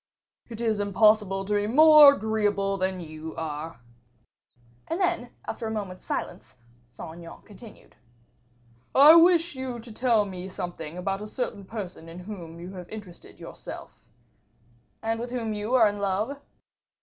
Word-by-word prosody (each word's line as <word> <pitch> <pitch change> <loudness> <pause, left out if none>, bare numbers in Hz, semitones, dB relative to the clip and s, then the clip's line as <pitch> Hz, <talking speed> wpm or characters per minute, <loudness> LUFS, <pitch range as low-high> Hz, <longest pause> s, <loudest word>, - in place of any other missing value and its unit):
"It 230 -1 -7
is 220 -3 0
impossible 205 -1 +2
to 210 - -2
be 205 0 +1
more 300 +2 +8
agreeable 205 -3 0
than 185 -1 -2
you 155 0 -8
are." 160 0 -6 1.1
And 330 +3 -3
then, 345 -9 0 0.2
after 225 0 -5
a - - -3
moment's 200 -4 -6
silence, - - -5 0.3
Saint 160 +7 -10
Aignan 170 -1 -12
continued, 215 +1 -15 1.0
"I 290 +4 +9
wish 335 0 +5
you 260 -2 -5
to 230 0 -11
tell 225 -2 +2
me 185 -2 -7
something 175 -4 -7
about 195 +2 -3
a 210 - -6
certain 210 -3 -5
person 185 -6 -8
in 165 - -10
who 180 -3 -9
you 175 +2 -9
have 180 -2 -9
interested 205 -5 -11
yourself." - - -10 0.9
"And 225 0 -1
with 240 +1 -5
whom 235 -3 -3
you 210 +4 -2
are 230 -4 +6
in 205 0 -3
love?" 210 +8 -2
210 Hz, 150 wpm, -26 LUFS, 185-235 Hz, 1.1 s, I